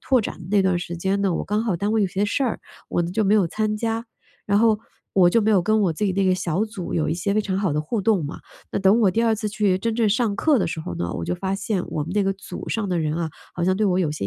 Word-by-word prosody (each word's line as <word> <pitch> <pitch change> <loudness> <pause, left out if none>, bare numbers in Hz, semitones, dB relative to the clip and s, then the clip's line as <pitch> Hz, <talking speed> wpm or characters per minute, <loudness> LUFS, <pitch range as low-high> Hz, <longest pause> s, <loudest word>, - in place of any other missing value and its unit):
拓 260 - +2
展 - - -5
的 170 - -9
那 205 -1 +4
段 190 -1 +2
儿 175 - +1
时 175 0 -5
间 190 +3 0
呢， 190 -4 +1
我 - - -2
刚 210 +2 0
好 205 -7 0
单 205 +4 -1
位 225 - +2
有 200 - +3
些 190 +2 -1
事 225 +7 0
儿， 240 - 0 0.3
我 175 - 0
呢 170 - -3
就 215 +4 0
没 205 +1 +3
有 200 -4 +4
参 215 +5 -1
加， 230 +1 -2 0.4
然 200 0 +3
后 220 -1 +4 0.3
我 180 -2 +5
就 225 +4 +3
没 220 - +2
有 200 -4 +5
跟 215 +5 +2
我 180 -5 +2
自 205 +6 -1
己 190 - 0
那 195 +1 +1
个 185 -1 +3
小 185 +2 -1
组 215 -5 -6
有 160 - +1
一 155 - 0
些 190 +4 -1
非 215 - +3
常 190 -2 -2
好 195 -4 0
的 150 - 0
互 215 +8 -2
动 195 -4 +2
嘛， 145 - -6 0.3
那 - - -1
等 195 +4 +4
我 205 -4 +4
第 225 +5 +1
2 225 -1 +3
次 215 0 -4
去 205 -3 +1
真 225 +4 -2
正 225 -2 +2
上 215 0 +1
课 295 +4 +3
的 - - +1
时 165 0 -4
候 85 - -5
呢， 85 0 -3
我 - - -4
就 90 +1 -1
发 190 - -2
现 195 -2 -2
我 160 -2 -2
们 165 +5 -5
那 205 - +3
个 195 0 +1
组 195 - -9
上 220 -3 -1
的 180 -2 0
人 155 -1 -1
啊， 165 0 -2 0.3
好 175 - -3
像 185 +1 +2
对 215 - +1
我 185 -1 +2
有 165 -5 +1
些 150 -10 -3
195 Hz, 345 characters per minute, -23 LUFS, 175-215 Hz, 0.4 s, 我